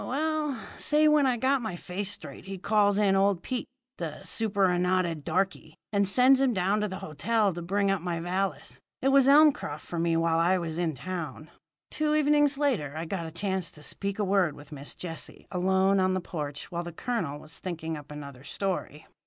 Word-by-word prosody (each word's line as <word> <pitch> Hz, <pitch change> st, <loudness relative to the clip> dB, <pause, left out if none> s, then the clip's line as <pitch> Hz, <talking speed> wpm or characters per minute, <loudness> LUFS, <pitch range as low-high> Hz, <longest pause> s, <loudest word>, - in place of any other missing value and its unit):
Well, 300 Hz, 0 st, -1 dB, 0.2 s
say! 305 Hz, +1 st, +4 dB
When 300 Hz, -2 st, +5 dB
I 250 Hz, -2 st, +1 dB
got 265 Hz, +3 st, +2 dB
my 220 Hz, -6 st, -4 dB
face 185 Hz, +3 st, -4 dB
straight 205 Hz, -, -7 dB
he 195 Hz, 0 st, -6 dB
calls 205 Hz, +1 st, +2 dB
in 200 Hz, -2 st, +3 dB
old 195 Hz, -2 st, +2 dB
Pete, 255 Hz, -2 st, -3 dB, 0.3 s
the 160 Hz, -3 st, -5 dB
superannuated 185 Hz, -6 st, +1 dB
darky, 170 Hz, -2 st, -1 dB, 0.2 s
and 200 Hz, -1 st, +3 dB
sends 255 Hz, +6 st, +5 dB
him 265 Hz, -3 st, +3 dB
down 195 Hz, +3 st, +1 dB
to 210 Hz, -, 0 dB
the 190 Hz, -, -5 dB
hotel 200 Hz, +6 st, +1 dB
to 175 Hz, -, -6 dB
bring 200 Hz, +3 st, +1 dB
up 195 Hz, -3 st, 0 dB
my 170 Hz, -1 st, -2 dB
valise. 175 Hz, -3 st, -3 dB, 0.2 s
It 270 Hz, -, +4 dB
was 270 Hz, -1 st, +5 dB
Elmcroft 280 Hz, -, +4 dB
for 170 Hz, -, -4 dB
me 165 Hz, 0 st, +2 dB
while 165 Hz, 0 st, +2 dB
I 180 Hz, +3 st, +3 dB
was 170 Hz, -2 st, -3 dB
in 170 Hz, -3 st, 0 dB
the -, -, -12 dB
town. 165 Hz, 0 st, -6 dB, 0.4 s
"Two 305 Hz, 0 st, +1 dB
evenings 295 Hz, -1 st, +3 dB
later 225 Hz, -, 0 dB
I 165 Hz, -, -3 dB
got 170 Hz, -1 st, -4 dB
a -, -, -8 dB
chance 190 Hz, 0 st, -2 dB
to 150 Hz, -, -13 dB
speak 200 Hz, +6 st, -3 dB
a 210 Hz, -, 0 dB
word 190 Hz, -6 st, +2 dB
with 145 Hz, 0 st, -14 dB
Miss 145 Hz, -1 st, -6 dB
Jessie 165 Hz, -2 st, -7 dB
alone 190 Hz, +1 st, +2 dB
on 185 Hz, 0 st, +2 dB
the -, -, 0 dB
porch 150 Hz, -5 st, -6 dB
while 170 Hz, 0 st, -2 dB
the 175 Hz, -, -6 dB
colonel 170 Hz, -, -3 dB
was 155 Hz, +2 st, -10 dB
thinking 165 Hz, -3 st, -4 dB
up 150 Hz, -1 st, -10 dB
another 140 Hz, -3 st, -9 dB
story. 165 Hz, -2 st, -3 dB
185 Hz, 200 wpm, -28 LUFS, 165-215 Hz, 0.4 s, When